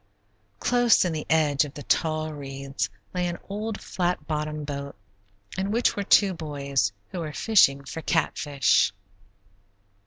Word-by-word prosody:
Close 245 -5 +4
in 175 - -1
the 155 -1 -4
edge 155 -2 +3
of 145 -2 -8
the 145 - -7
tall 155 +4 0
reeds 135 -1 -4 0.2
lay 180 -1 0
an 175 0 -3
old 210 +2 -4
flat 175 -4 -2
bottomed 150 -1 -3
boat 140 -1 -5 0.6
in 195 +1 -1
which 230 +3 +2
were 205 - -2
two 200 -1 +4
boys, 140 - -1 0.2
who 180 - -5
were 155 -2 -4
fishing 140 -9 +4
for 160 - -6
catfish. 145 -6 +2
155 Hz, 145 wpm, -26 LUFS, 140-180 Hz, 0.6 s, Close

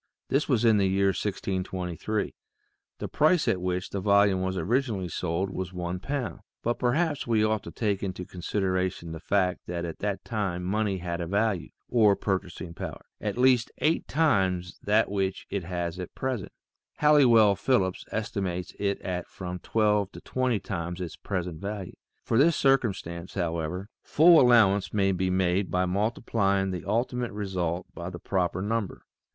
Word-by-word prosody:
This 140 +3 +1
was 120 -4 +3
in 110 -2 +6
the 100 -1 +3
year 95 +1 +2
1623. 95 0 -2 0.6
The - - -4
price 155 +2 +3
at 90 - +1
which 90 0 -2
the 100 - -3
volume 100 -1 +4
was 95 0 -1
originally 105 0 0
sold 90 +3 -2
was 95 -1 -4
one 90 0 -3
pound, 135 +3 -3 0.2
but 120 +1 0
perhaps 145 +4 +1
we 110 -2 +3
ought 110 -1 +1
to - - -7
take 105 -4 -1
into 90 -2 -4
consideration 95 -1 -2
the 80 - -6
fact 90 0 0
that 85 0 -3
at 85 - -6
that 100 -1 -3
time 100 -6 -2
money 100 +1 0
had 85 -1 -4
a 85 - -3
value, 100 -1 0 0.2
or 110 -4 +4
purchasing 90 -3 -3
power, - - -7
at 105 +1 -3
least 125 -2 +4
eight 160 +2 +1
times 95 - +1
that 105 +2 +3
which 95 -1 -1
it 100 -4 -2
has 85 -1 -3
at 90 - -7
present; 130 -7 -3 0.5
Halliwell 120 -9 +6
Phillips 95 -6 +1
estimates 95 -5 -3
it 100 -1 0
at 90 -1 -3
from 90 -1 -6
twelve 105 -1 +1
to - - -10
twenty 130 -4 0
times 85 -1 -4
its 90 -3 -5
present 90 -4 -4
value. 100 -2 -5 0.3
For 115 - +1
this 160 +3 +5
circumstance, 100 -10 0
however, 85 +1 -2
full 165 +2 +6
allowance 110 -6 +4
may 95 -1 +3
be 95 0 0
made 95 +1 +1
by 90 +1 +1
multiplying 100 0 0
the 90 -2 -5
ultimate 120 +3 -1
result 95 -4 -2
by 85 +2 -6
the 90 - -7
proper 90 0 -1
number. 110 -1 -2
95 Hz, 165 wpm, -27 LUFS, 90-110 Hz, 0.6 s, in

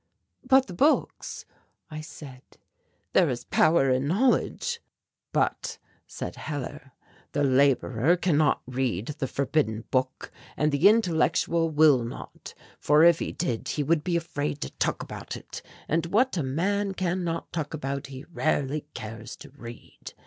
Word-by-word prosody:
"But 265 0 +5
the 185 - -9
books," 285 - 0 0.5
I 155 0 -5
said, 140 -4 -11 0.7
"there - - +5
is - - -3
power 155 -5 +3
in 130 +2 +1
knowledge." 260 - +1 0.5
"But," - - -1 0.3
said - - -6
Hellar, 135 -3 -6 0.4
"the 145 - +1
labourer 135 +2 +3
can 175 -3 +1
not 150 0 +2
read 125 -4 -2
the 135 - -1
forbidden 135 -5 0
book 130 0 -1 0.3
and 150 0 +2
the 145 +8 +6
intellectual 170 -5 +2
will 150 -5 +5
not, 115 - -9 0.2
for 150 +2 +4
if 170 -1 +6
he - - -3
did 125 -10 -3
he 150 - -1
would 155 +1 +1
be 175 -2 +1
afraid 150 -3 -3
to - - -4
talk - - -1
about - - -7
it, - - -9 0.3
and 165 +1 0
what 235 +8 +2
a 170 - 0
man 195 +9 -1
can 185 0 -1
not 165 -1 -4
talk 155 -2 -3
about 140 -1 -4
he 135 0 -9
rarely 145 -1 0
cares 110 0 -7
to 145 - -13
read. 120 -4 -11
150 Hz, 150 wpm, -27 LUFS, 135-170 Hz, 0.7 s, the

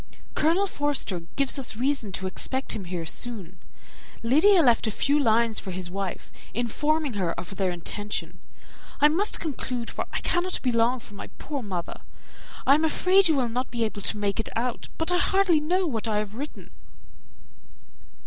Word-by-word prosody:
Colonel 335 +6 +3
Forster 290 - -1 0.2
gives 275 0 +1
us 255 - 0
reason 250 -3 0
to 190 - -4
expect 260 +8 -2
him 195 - -5
here 175 -2 -4
soon. 190 -2 -2 0.6
Lydia 325 - +6
left 240 -3 +4
a - - +2
few 285 +7 +1
lines 230 -3 +3
for 195 - -7
his 180 -1 -3
wife, 195 0 -4 0.2
informing 295 +5 0
her 185 -5 -1
of 185 +3 -7
their 190 -2 +1
intention. 205 +4 -4 0.6
I 295 - +6
must 380 +7 +1
conclude, 250 -6 -3
for - - -4
I - - -2
cannot 360 +1 0
be 255 - +2
long 235 +2 +2
from 205 - -12
my - - -7
poor 285 -2 -4
mother. 185 -6 -5 0.6
I 275 - +7
am 305 +3 +3
afraid 365 +4 +4
you 320 - +3
will 255 -4 +1
not 250 +3 -2
be 235 -1 -1
able 215 -2 -3
to 210 - +1
make 200 -1 -1
it 225 - -1
out, 240 +1 -2
but 325 +2 +1
I 355 - +3
hardly 380 -4 +3
know 360 +5 +1
what 230 -8 -2
I 215 -2 +1
have 210 -1 -2
written." 285 +6 -7
240 Hz, 180 wpm, -26 LUFS, 205-300 Hz, 0.6 s, I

